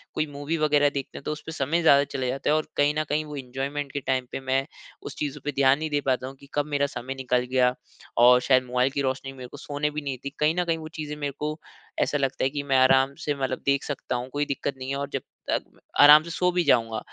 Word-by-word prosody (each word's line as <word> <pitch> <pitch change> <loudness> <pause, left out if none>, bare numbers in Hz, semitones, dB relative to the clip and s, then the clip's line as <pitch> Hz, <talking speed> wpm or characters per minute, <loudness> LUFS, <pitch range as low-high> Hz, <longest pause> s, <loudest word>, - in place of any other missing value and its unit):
कोई 155 - +1
मूवी 145 +3 -3
वगैरह 145 -2 +3
देखते 140 -2 -5
हैं - - -9
तो - - -3
उस 150 - -5
पे - - -6
समय 160 +3 0
ज़्यादा 140 -4 +6
चले 130 -1 -1
जाता 135 +2 -2
है - - +4
और 155 - -1
कहीं 145 +1 +3
न - - +1
कहीं 155 +1 0
वो 150 -1 -8
एन्जॉयमेंट 135 +2 -4
के 140 - -3
टाइम 130 -2 -1
पे - - -4
मैं 135 +1 0 0.4
उस - - -7
चीज़ों 145 -1 -3
पे 145 - 0
ध्यान 135 +1 +4
नहीं 155 0 -3
दे 145 -1 0
पाता 130 0 0
हूँ 135 - -9
कि 140 - -16
कब 145 -1 +1
मेरा 145 -1 +1
समय 125 +2 -5
निकल 125 -2 0
गया। 125 -1 +3 0.4
और 125 +1 +7
शायद 130 0 +3
मोबाइल 125 +1 +1
की 140 - -1
रोशनी 135 0 -2
मेरे 130 -2 -9
को 145 - -11
सोने 145 +1 -2
भी 150 +1 -4
नहीं 140 -2 -3
देती। 140 +2 -7
कहीं 150 +2 +3
न - - +2
कहीं 165 -1 0
वो 160 -1 -8
चीज़ें 150 -1 -4
मेरे 145 -1 -3
को 150 +1 -3 0.4
ऐसा 145 - +1
लगता 135 -1 -1
है - - +2
कि 145 0 -3
मैं 135 -2 +2
आराम 135 +1 +4
से 150 - +1
मतलब 135 -2 -2
देख 140 0 +2
सकता 140 -3 -4
हूँ 125 +1 -4
कोई 145 0 0
दिक्कत 140 0 -3
नहीं 130 0 -6
है - - -1
और 140 0 -4
जब - - -1 0.3
तक - - +1 0.4
आराम 150 +1 +9
से 170 - -9
सो 180 +1 +1
भी 180 0 +2
जाऊँगा। 115 -5 +2
140 Hz, 275 wpm, -25 LUFS, 130-150 Hz, 0.4 s, आराम